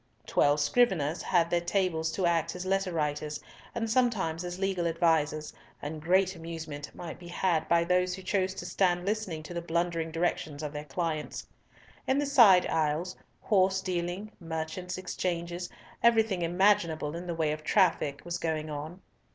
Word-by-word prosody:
Twelve 145 +1 +3
scriveners 170 -3 +2
had 170 -2 +2
their 175 - +2
tables 175 -3 0
to 185 - 0
act 170 -1 +1
as 180 +1 -5
letter 195 0 0
writers, 150 -2 -2 0.4
and 230 -1 -1
sometimes 215 -9 +1
as 175 0 -5
legal 190 -3 0
advisers, 160 -2 +1 0.3
and 155 +1 -6
great 185 +3 +2
amusement 160 -3 -7
might 170 -2 -7
be 175 - -11
had 175 -2 0
by 170 0 +4
those 180 +1 +1
who 190 - -10
chose 190 0 0
to - - -6
stand 180 -2 +1
listening 195 -7 -2
to 165 - -8
the 170 - -3
blundering 170 -1 -1
directions 160 -3 -2
of 150 -1 -4
their 150 0 -5
clients. 155 +2 -3 0.6
In 265 - +2
the 290 - +1
side 230 -10 +7
aisles, 160 +3 0 0.3
horse 190 -2 +3
dealing, 185 +2 -3
merchants' 165 +2 -4
exchanges, 175 -1 -3 0.3
everything 225 -5 +3
imaginable 170 -4 +2
in 175 +1 -6
the 170 - -2
way 160 -2 +1
of 155 0 -5
traffic 165 -6 +2
was 175 0 -3
going 155 -1 -2
on. 155 +5 -6
170 Hz, 165 wpm, -29 LUFS, 160-185 Hz, 0.6 s, side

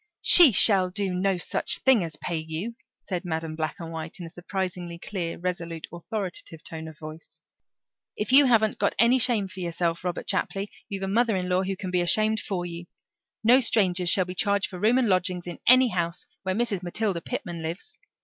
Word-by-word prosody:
"She 340 -7 +10
shall 190 -3 +4
do 195 0 -3
no 185 +1 0
such 175 - 0
thing 260 -7 +3
as 165 -2 -5
pay 170 - -4
you," 160 +8 -5 0.3
said 180 -2 -5
Madam 160 -2 -4
Black 155 -1 -3
and 165 -1 -7
White 160 +2 -7
in 175 - -7
a 165 - -10
surprisingly 180 -1 -5
clear, 170 -2 -5
resolute, 170 -2 -5
authoritative 175 -3 -5
tone 160 -1 -7
of 160 -1 -12
voice. 155 +1 -11 0.8
"If 210 +2 -2
you 275 +1 +7
haven't 220 -3 +2
got - - 0
any 240 +3 +4
shame 230 -5 +3
for 190 - -11
yourself, 170 -1 -2
Robert 180 -2 -4
Chapley, 200 +1 -2 0.2
you've 195 -1 -5
got - - -2
a - - -4
mother 225 +1 +1
in 180 0 -3
law 180 +1 +2
who 190 0 -3
can 185 -1 -6
be 180 -1 +1
ashamed 215 +5 +3
for 180 -4 -4
you. 170 0 -8 0.6
No 245 +4 +6
strangers 185 -7 +1
shall 185 0 +3
be 180 - -7
charged 200 +1 0
for 180 - -8
room 225 +6 +3
and 255 -3 +2
lodging 185 -2 0
in 175 -1 -8
any 255 0 +6
house 170 -3 -3 0.2
where 190 0 -2
Mrs. 215 -5 -1
Matilda 185 0 -1
Pitman 175 -6 -5
lives. 170 - -6
185 Hz, 205 wpm, -25 LUFS, 170-210 Hz, 0.8 s, She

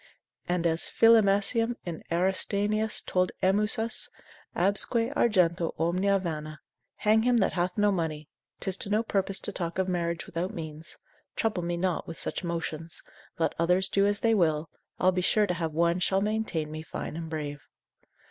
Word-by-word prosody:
And 175 -1 0
as 165 0 +1
Philemasium 225 +1 +4
in 170 -3 -5
Aristaenetus 200 +4 0
told 180 0 +1
Emmusus, 210 +4 +1 0.5
absque 205 +5 +1
argento 175 -6 +2
omnia 185 +4 +2
vana, 155 -4 -5 0.4
hang 215 +1 +3
him 245 +1 +3
that 200 - +2
hath 180 +1 -1
no 205 0 +4
money, 160 -5 -2 0.3
'tis 190 0 -1
to 200 - -3
no 215 +2 +2
purpose 195 -3 0
to - - +2
talk 170 -1 -3
of 190 0 +1
marriage 170 -2 -1
without 175 +3 -4
means, 160 0 -6 0.4
trouble 215 -5 0
me 175 0 -2
not 180 -1 -1
with 165 - -7
such - - -3
motions; 165 -1 -4 0.3
let 165 - +1
others 180 +3 +2
do 200 0 +3
as 205 0 0
they 225 -1 +3
will, 160 -6 +1 0.3
I'll 185 - +4
be 180 0 -1
sure 210 +3 +3
to 180 - -1
have 165 -2 -2
one 170 +3 +2
shall 190 +2 +2
maintain 210 -8 -1
me 155 0 -5
fine 160 - -6
and 165 -1 -5
brave. 145 -2 -5
180 Hz, 165 wpm, -28 LUFS, 165-205 Hz, 0.5 s, Philemasium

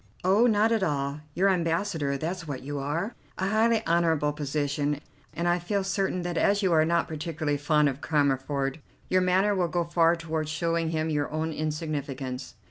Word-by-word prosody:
"Oh, 200 +6 +4
not 220 0 +3
at 225 -2 +2
all; 145 -4 -1 0.2
you're 190 +2 +3
ambassador, 165 -5 0
that's 170 +3 -4
what 135 -3 -5
you 145 +1 -4
are; 165 - -2 0.2
a 190 - -1
highly 220 +1 +2
honourable 165 -3 +2
position, 145 0 -1 0.3
and 170 +1 -2
I 175 0 +2
feel 195 +3 -1
certain 195 -2 -1
that 175 -1 -1
as 200 +1 +2
you 185 -3 +3
are 155 -1 +5
not 170 0 +1
particularly 155 -2 -2
fond 150 0 +3
of 140 0 -3
Cammerford 140 -1 0 0.3
your 185 0 +3
manner 190 +3 +3
will 180 -3 +1
go 175 +1 0
far 170 0 +3
toward 160 -2 -3
showing 165 +1 0
him 160 0 -1
his 145 -2 0
own 160 +1 -2
insignificance. 145 -4 -4
160 Hz, 180 wpm, -27 LUFS, 145-180 Hz, 0.3 s, are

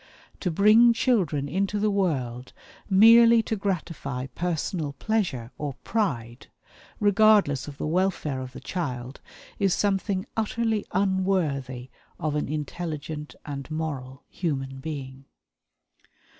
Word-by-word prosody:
To 185 - -1
bring 215 +7 +6
children 185 - +1
into 195 +7 -1
the 210 0 +2
world 130 -11 -1 0.4
merely 230 +3 +7
to 220 - -2
gratify 165 -10 -3
personal 165 -3 -2
pleasure 140 - -2
or 145 -3 -3
pride, 125 - -2 0.5
regardless 205 - +4
of 145 -1 -8
the - - -3
welfare 160 -5 0
of 130 0 -8
the - - -9
child, 130 -7 -4 0.4
is 195 -3 +2
something 195 -1 0
utterly 225 -1 -1
unworthy 170 -10 0 0.3
of 155 -1 -1
an 150 -2 -1
intelligent 150 0 -5
and 140 -1 -6
moral 140 -4 -5
human 135 -6 -3
being. 135 -2 -7
160 Hz, 115 wpm, -26 LUFS, 140-200 Hz, 0.5 s, merely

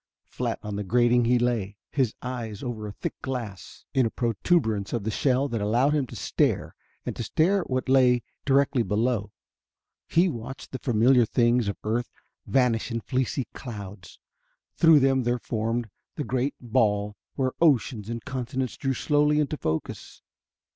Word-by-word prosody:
Flat - - -2
on 105 -1 -4
the 105 - -2
grating 120 +3 +3
he 125 +1 +4
lay, 115 -5 -1
his 130 -6 0
eyes 120 -5 -5
over 115 -4 -4
a - - -5
thick - - -4
glass 115 -7 -6
in 130 -4 +3
a - - -2
proturbance 110 - 0
of 115 -4 -1
the 110 - -1
shell 135 +3 +1
that 115 -4 -2
allowed 120 +8 +2
him 145 -4 +1
to - - -10
stare - - 0 0.3
and - - -3
stare 180 - +2
at - - -8
what 130 0 -1
lay 125 -2 +4 0.2
directly 135 -2 +3
below. 105 0 0 0.8
He 170 +3 +3
watched 135 -3 -6
the 130 - -5
familiar 120 +1 +4
things 120 -1 +2
of 100 - -2
earth 115 +3 -1 0.4
vanish 125 -4 +2
in 115 -1 -3
fleecy 130 +1 -1
clouds; 100 -7 -9 0.6
through 160 -3 +6
them 135 0 +3
there 120 0 0
formed 115 0 -2 0.3
the 150 - -3
great 130 +1 -1
ball, 105 -4 +1 0.2
where 130 -2 0
oceans 125 -8 +2
and 115 -1 -5
continents 130 -1 -3
drew 135 -1 -1
slowly 150 +1 +2
into 150 0 0
focus. 80 - -4
120 Hz, 160 wpm, -26 LUFS, 110-135 Hz, 0.8 s, through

